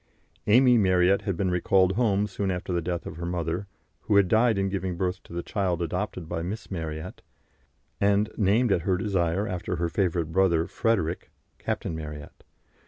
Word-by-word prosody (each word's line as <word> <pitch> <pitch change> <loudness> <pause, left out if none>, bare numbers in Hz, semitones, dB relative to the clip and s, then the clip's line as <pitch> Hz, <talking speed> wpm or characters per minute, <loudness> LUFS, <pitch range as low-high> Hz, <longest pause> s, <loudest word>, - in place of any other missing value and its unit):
Amy 125 +2 +6
Marryat 95 0 +3
had 95 -5 -1
been 95 0 0
recalled 95 +1 +3
home 105 -1 +1
soon 100 -1 -3
after 90 0 -3
the 85 - 0
death 85 0 -3
of - - -7
her 85 - -5
mother, 85 +2 -2 0.3
who 105 - 0
had 100 -2 +5
died 110 +1 +3
in 95 0 +1
giving 95 -2 -3
birth 90 0 -2
to - - -18
the 85 0 -4
child 95 -5 -1
adopted 90 0 -3
by 80 0 -3
Miss 100 +7 -6
Marryat, 80 -1 -5 0.8
and 100 +1 +2
named 110 +3 +2
at 90 - +2
her 90 +2 +1
desire 95 0 0
after 90 +1 -3
her 85 0 -1
favourite 85 -3 0
brother 85 -3 +3
Frederick 90 -6 -1 0.3
(Captain 80 - -3
Marryat). 75 -2 -8
95 Hz, 175 wpm, -26 LUFS, 85-100 Hz, 0.8 s, Amy